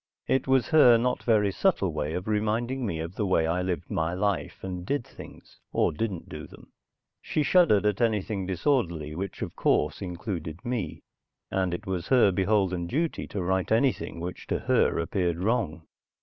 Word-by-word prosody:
It 130 0 +1
was 130 -2 +3
her 135 -7 +7
not 125 +2 0
very 105 -4 +3
subtle 95 - +1
way 75 0 -2
of 90 +3 -4
reminding 110 +4 0
me 85 - -2
of 80 +2 -5
the 105 - -2
way 80 -3 +2
I 85 +3 0
lived 90 -1 -3
my 80 +2 0
life 100 0 -2
and 90 -2 -4
did 130 +5 -1
things, - - -13
or - - +2
didn't 95 +1 -3
do - - -8
them. - - -16 0.5
She 155 - -1
shuddered 145 - +4
at 105 0 +1
anything 105 -4 0
disorderly, 85 - 0
which 95 +5 -5
of - - -6
course 75 +4 +1
included 90 -3 -5
me, 120 -6 -3 0.5
and 95 -2 0
it 85 - -4
was 95 -2 -3
her 125 -7 +5
beholden 95 -2 +1
duty 160 - -1
to 100 - -4
right 95 +2 0
anything 115 -6 +1
which 90 +2 -6
to - - 0
her - - +2
appeared 85 0 0
wrong. 95 -5 -1
95 Hz, 180 wpm, -27 LUFS, 85-115 Hz, 0.5 s, her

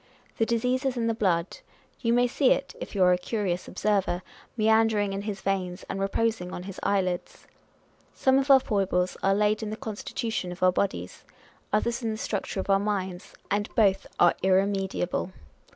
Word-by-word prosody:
The 225 - +2
disease 250 +3 0
is 265 -2 -1
in 230 - 0
the 230 - +1
blood: 185 - 0 0.4
you 230 - 0
may 245 +1 +4
see 255 +2 +2
it 275 - +1
(if - - -7
you 190 - +3
are 180 0 +6
a 180 - 0
curious 180 -2 -2
observer) 195 -3 0 0.3
meandering 220 -2 +3
in 195 - -3
his 205 -1 -5
veins, 185 -2 -2
and 195 - -4
reposing 195 -1 -1
on 180 - -6
his 190 0 -8
eyelids! 185 -3 -1 0.7
Some 265 0 +3
of 275 +1 -2
our 270 -1 +9
foibles 190 -6 0
are 195 0 +3
laid 210 +1 +2
in 215 - -3
the 215 - -5
constitution 220 -3 -4
of 180 +1 -6
our 185 - +6
bodies; 135 - -2 0.5
others 235 +3 0
in 230 - -1
the 215 - -3
structure 200 -2 -3
of - - -3
our 195 -1 +4
minds, 190 -3 -3 0.2
and 205 +1 0
both 195 -4 +3
are - - +6
irremediable. 190 -1 0
200 Hz, 185 wpm, -27 LUFS, 185-225 Hz, 0.7 s, our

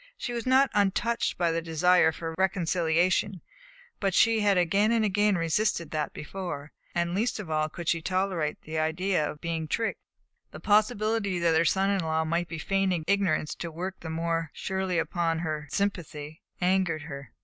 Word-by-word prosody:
She 245 - -4
was 235 0 -4
not 265 +2 +4
untouched 205 +3 +1
by 170 -2 +2
the 165 0 -1
desire 165 +1 +3
for 165 0 -5
reconciliation, 185 +1 +1 0.6
but 195 -2 0
she 225 -1 +4
had 205 -2 +3
again 195 +5 +3
and 230 -2 +2
again 205 0 +2
resisted 170 -1 0
that 150 -2 -2
before, 155 -3 -6 0.2
and 170 0 0
least 220 +4 0
of 185 -6 -6
all 155 0 +1
could 170 +1 -8
she 165 - +1
tolerate 185 -4 -1
the 155 0 -3
idea 160 0 0
of 150 - -9
being 165 -2 -3
tricked. 225 +8 -1 0.5
The - - -10
possibility 215 -2 +2
that 170 -1 +2
her 160 +1 +3
son 195 +4 +2
in 200 - +1
law 160 -1 0
might 170 +2 0
be 165 - -6
feigning 190 0 0
ignorance 175 -6 +1
to 170 - -6
work 185 +4 -5
the 160 - -7
more 165 0 -1
surely 190 -2 -2
upon 165 0 0
her 155 -3 -3
sympathy 155 -5 -3 0.2
angered 180 -4 +1
her. 140 -2 -9
175 Hz, 175 wpm, -28 LUFS, 160-195 Hz, 0.6 s, not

